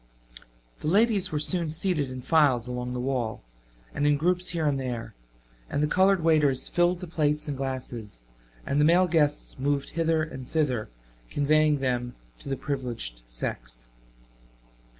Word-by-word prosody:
The - - -5
ladies 200 +1 +3
were 155 - -1
soon 165 +2 +1
seated 160 -3 0
in 130 -1 -7
files 135 -5 +3
along 125 0 -4
the 125 - -3
wall, 125 - -2 0.5
and 145 - +1
in 145 -1 +4
groups 180 +4 +1
here 165 -3 -1
and 140 -2 +1
there, 120 -4 -4 0.6
and 145 - 0
the - - +3
colored 190 +2 +3
waiters 150 -5 +3
filled 175 +1 +1
the 180 - -6
plates 150 -2 0
and 145 - -2
glasses 125 - -5 0.4
and 145 +1 +1
the - - +5
male 175 +3 +5
guests 150 -6 +1
moved 140 +1 -1
hither 165 -1 +1
and 130 -5 -7
thither 135 -8 0 0.4
conveying 150 0 +2
them 125 -2 -1 0.2
to - - -9
the 135 - -1
privileged 120 - -4
sex. - - -4
145 Hz, 155 wpm, -27 LUFS, 125-160 Hz, 0.6 s, the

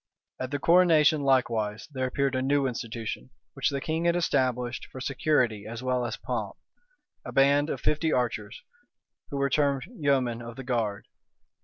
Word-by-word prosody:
At 130 - -3
the 145 - -1
coronation, 160 -2 +5
likewise, 115 -5 +1
there 130 -2 -1
appeared 140 +1 0
a 130 - 0
new 140 +1 +2
institution, 115 - -4 0.2
which - - 0
the 140 - -2
king 160 +4 -2
had 170 0 +3
established 125 -7 0
for 130 - -8
security 125 -6 0
as 115 +2 -6
well 125 -1 0
as - - -5
pomp, - - -4 0.7
a - - -7
band 140 +2 +4
of - - -3
fifty 155 +1 +1
archers, 115 -5 -2 0.7
who 140 - -4
were 140 -1 0
termed 140 -2 +2
yeomen 140 - 0
of 120 0 -8
the 135 - -7
guard. 115 -5 -2
130 Hz, 165 wpm, -27 LUFS, 120-145 Hz, 0.7 s, coronation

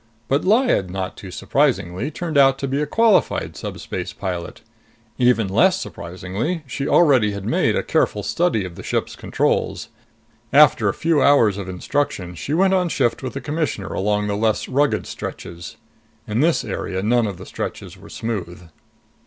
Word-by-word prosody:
But 140 +3 +1
Lyad, 215 - +2
not 95 0 -4
too 95 - -10
surprisingly, 100 - 0
turned 160 +1 -5
out 135 -1 +5
to 135 - -3
be 135 +2 -1
a 150 - -1
qualified 225 +5 +2
subspace 90 -1 -6
pilot. 90 -3 -5 0.6
Even 120 -4 +3
less 185 - +3
surprisingly, 95 - -4
she 135 +2 -4
already 130 -11 +4
had 100 -1 -6
made - - +1
a - - 0
careful - - 0
study 165 - 0
of 90 - -7
the - - -10
ship's - - -2
controls. - - -1 0.6
After - - +5
a - - 0
few 165 -3 +1
hours 115 -9 +4
of 95 -2 -6
instruction, 95 -1 -2
she 140 - -3
went 190 +2 +3
on 180 -2 +2
shift 120 - 0
with 130 -2 -5
the 135 - -5
Commissioner 145 -8 -3
along 105 +1 0
the 100 0 -1
less 110 +1 0
rugged 130 -7 +1
stretches. 85 -1 -7 0.5
In 105 +2 -1
this 165 +4 +2
area, 95 0 -3
none 115 +1 +2
of 100 -3 -5
the - - -10
stretches - - -6
were - - -15
smooth. 90 -6 -5
115 Hz, 170 wpm, -21 LUFS, 95-145 Hz, 0.6 s, out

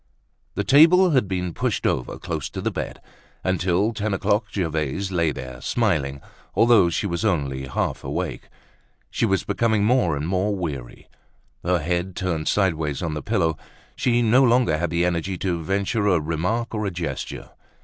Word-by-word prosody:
The - - 0
table 165 +7 +6
had 130 -8 +2
been 90 -2 -2
pushed - - -1
over 65 -2 -1
close - - -4
to - - -6
the - - -1
bed. - - -5 0.4
Until 95 +4 +1
ten 105 -1 -1
o'clock 105 +3 +1
Gervaise 80 0 -2
lay 85 -4 +1
there, 65 -2 -8
smiling 75 - 0 0.3
although 115 -6 +5
she 85 - -1
was 85 -1 -2
only 70 -10 -1
half 65 - -2
awake. - - -4 0.6
She 115 - +1
was 95 -2 +1
becoming 110 -3 +1
more 105 - +2
and 75 +3 -3
more 95 +3 0
weary, 70 -10 -6 0.6
her 90 +1 +2
head 90 +3 -2
turned 85 -4 -2
sideways 80 -7 0
on 80 -2 -2
the 75 - -4
pillow. 85 -8 0 0.4
She 120 -1 +2
no 120 +4 +5
longer 120 -10 +3
had 85 - -1
the 85 +1 +1
energy 90 +1 -1
to 85 -2 -2
venture 100 +4 0
a 90 -4 +4
remark 90 +10 -2
or 105 -2 -1
a - - +1
gesture. 85 -3 -5
90 Hz, 170 wpm, -23 LUFS, 80-105 Hz, 0.6 s, table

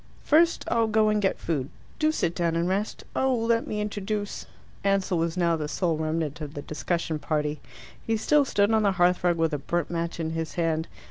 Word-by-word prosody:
"First, 335 +2 +3
I'll 230 -1 +2
go 215 0 +3
and 210 0 +2
get 195 - +1
food. 145 -5 -2 0.3
Do 310 0 +3
sit 175 - 0
down 170 -2 0
and 170 +1 +1
rest. 200 +3 -2
Oh, 265 -1 +2
let 230 0 +1
me 210 - -2
introduce 205 0 -3 0.2
" - - -27
Ansell 195 -3 +1
was 165 +1 -1
now 170 -2 +3
the 155 -2 -3
sole 170 +1 0
remnant 155 0 -2
of 150 0 -6
the 145 - -5
discussion 160 0 -2
party. 150 -1 -1 0.4
He 225 0 0
still 295 +6 +4
stood 205 -5 +2
on 220 -1 +4
the 200 -2 +3
hearthrug 175 -1 +3
with 165 -1 +1
a 150 - -1
burnt 170 +5 -2
match 170 0 -3
in 160 -1 -2
his 160 -1 -4
hand. 165 -2 0
175 Hz, 210 wpm, -26 LUFS, 160-210 Hz, 0.4 s, still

